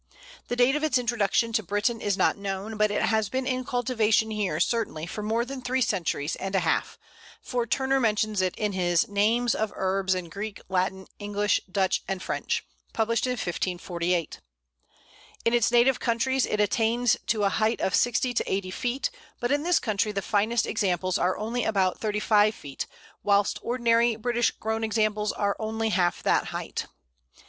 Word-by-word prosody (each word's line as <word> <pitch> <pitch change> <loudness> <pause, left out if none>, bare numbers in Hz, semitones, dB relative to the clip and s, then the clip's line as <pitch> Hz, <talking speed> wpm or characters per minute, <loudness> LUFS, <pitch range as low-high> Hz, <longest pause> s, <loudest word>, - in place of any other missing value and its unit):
The 245 - -2
date 250 +3 +4
of 300 - -1
its 295 -5 +3
introduction 230 -1 +1
to 220 - +2
Britain 205 +4 -1
is 200 -2 0
not - - +3
known, 200 +2 -4
but 215 0 +2
it 205 - 0
has 220 -2 +1
been 260 +3 -2
in 255 -1 -1
cultivation 225 -3 +1
here 200 -7 -1
certainly 185 -5 0
for 195 +5 -6
more 225 +3 0
than 265 0 -6
three 255 +1 +1
centuries 170 -7 -1
and 195 0 -4
a 190 - +3
half, 165 -2 0 0.4
for 245 -2 -2
Turner 270 +3 +1
mentions 215 -3 +1
it 185 -1 0
in 210 -1 -1
his 175 -3 +1
"Names 220 +4 +2
of 220 0 -1
Herbes 190 0 0
in 180 -2 -5
Greke, 200 +4 -6
Latin, 190 0 -1
Englishe, 205 0 +1
Duch, 190 -1 +1
and 195 -1 -2
Frenche," - - -2 0.3
published 230 +2 +1
in 250 - 0
1548. 175 -4 -2 1.1
In 230 - +3
its 240 -1 +3
native 245 +2 +4
countries 260 +2 +1
it 210 - -1
attains 225 +3 +2 0.2
a 205 -2 +2
height 220 +4 +1
of 190 - 0
sixty 245 +1 +2
to - - -1
eighty 190 -1 -1
feet, 245 +6 -2 0.3
but 240 +1 -1
in 290 0 +2
this 350 +2 +3
country 215 -1 0
the 200 -1 -3
finest 220 +2 +1
examples 185 -3 0
are 180 +1 +1
only 230 +3 -2
about 190 -4 +1
thirty 210 -1 -1
five 210 0 +3
feet, 140 -2 -6 0.3
whilst 200 -1 +2
ordinary 235 -1 +2
British 240 +1 +1
grown 220 +1 -3
examples 215 -1 +1
are 200 -1 -1
only 220 0 -1
half 175 -4 +1
that - - +2
height. - - -5
215 Hz, 175 wpm, -26 LUFS, 195-235 Hz, 1.1 s, date